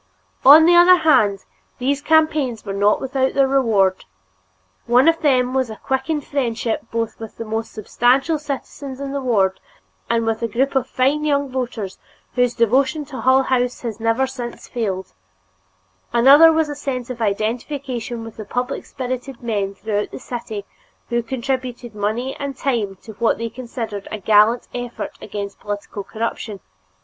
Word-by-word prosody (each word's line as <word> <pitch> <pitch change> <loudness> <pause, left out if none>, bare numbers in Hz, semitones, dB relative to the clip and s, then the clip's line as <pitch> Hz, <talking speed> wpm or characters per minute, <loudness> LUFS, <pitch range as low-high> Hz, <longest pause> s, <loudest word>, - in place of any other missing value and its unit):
On 300 +4 +9
the 345 +1 +6
other 350 +1 +8
hand, 220 - +3 0.3
these 275 +3 0
campaigns 305 -8 +2
were 200 - -4
not 205 +1 +3
without 265 0 -1
their 275 -1 +4
rewards; 220 -9 +2 0.8
one 250 +5 +5
of 330 0 +4
them 255 -4 +2
was 260 -2 0
a 220 - -6
quickened 265 +5 -2
friendship 230 -5 -2
both 230 -1 -3
with 225 -1 -9
the 230 - -5
more 220 +1 -2
substantial 250 +8 +1
citizens 275 -2 -6
in 280 -1 -4
the 280 0 -2
ward 200 -7 +1 0.5
and 230 -1 +1
with 225 0 -1
a 230 - 0
group 255 +5 0
of 265 -2 +1
fine 275 +4 +1
young 285 -2 0
voters 240 -7 -4 0.3
whose 245 -1 +1
devotion 260 +6 +2
to 270 -2 -7
Hull 260 +1 +4
House 250 -1 0
has 230 -3 -5
never 230 +3 +1
since 250 -3 -7
failed; 195 -6 -3 1.0
another 280 +7 +7
was 320 -1 +2
a 295 - -4
sense 260 -4 -4
of 235 -2 -7
identification 235 +3 -2
with 225 -1 -9
public 250 0 -3
spirited 255 0 -5
men 200 -4 -2
throughout 210 +1 -2
the - - -8
city 225 -5 -6 0.4
who 240 0 +1
contributed 250 -1 -4
money 220 +6 -2
and 280 -2 -5
time 230 -9 -1
to 220 - -10
what 235 - +2
they 230 0 -4
considered 230 -4 -6
a 215 - -4
gallant 215 +3 +4
effort 245 -1 -5
against 200 -1 -6
political 205 0 -5
corruption. 220 -1 -4
245 Hz, 160 wpm, -20 LUFS, 220-270 Hz, 1.0 s, On